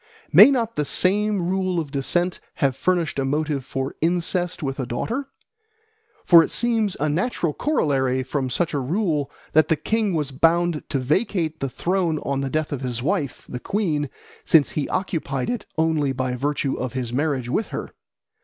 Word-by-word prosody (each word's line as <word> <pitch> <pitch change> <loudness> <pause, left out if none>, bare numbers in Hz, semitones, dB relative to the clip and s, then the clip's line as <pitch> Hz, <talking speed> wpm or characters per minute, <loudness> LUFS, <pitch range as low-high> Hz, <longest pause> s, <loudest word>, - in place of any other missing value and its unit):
May - - +10
not 235 -5 0
the 150 - +2
same 195 +3 +1
rule 185 -1 0
of 150 -4 -5
descent 175 +6 0 0.2
have 135 -4 +1
furnished 170 -2 0
a - - +1
motive 145 0 -1
for 135 +1 -4
incest 175 +1 -1
with 135 0 -3
a 130 - -2
daughter? 235 - -3 1.0
For 170 -2 +8
it - - -3
seems 225 -4 +1
a 150 - +1
natural 170 0 0
corollary 135 - +1
from 130 0 -2
such 165 +6 0
a 145 - 0
rule 150 0 0 0.2
that 155 +1 +5
the 160 - +3
king 210 +4 0
was 150 -3 -1
bound 165 +3 +2
to 145 - 0
vacate 160 - 0
the 135 - -2
throne 175 +2 0
on 140 -1 -1
the 135 - -2
death 155 +2 -1
of 140 -3 -3
his 125 -2 -3
wife, 150 -4 -2
the 125 - -5
queen, 155 -6 -1 0.3
since 155 -4 +4
he 150 - -2
occupied 160 - -2
it 240 -4 -4
only 160 -4 +1
by 130 -1 -2
virtue 140 +1 -1
of 130 0 -4
his 125 -2 -3
marriage 140 -3 0
with 210 - -1
her. - - -6
155 Hz, 180 wpm, -23 LUFS, 135-180 Hz, 1.0 s, May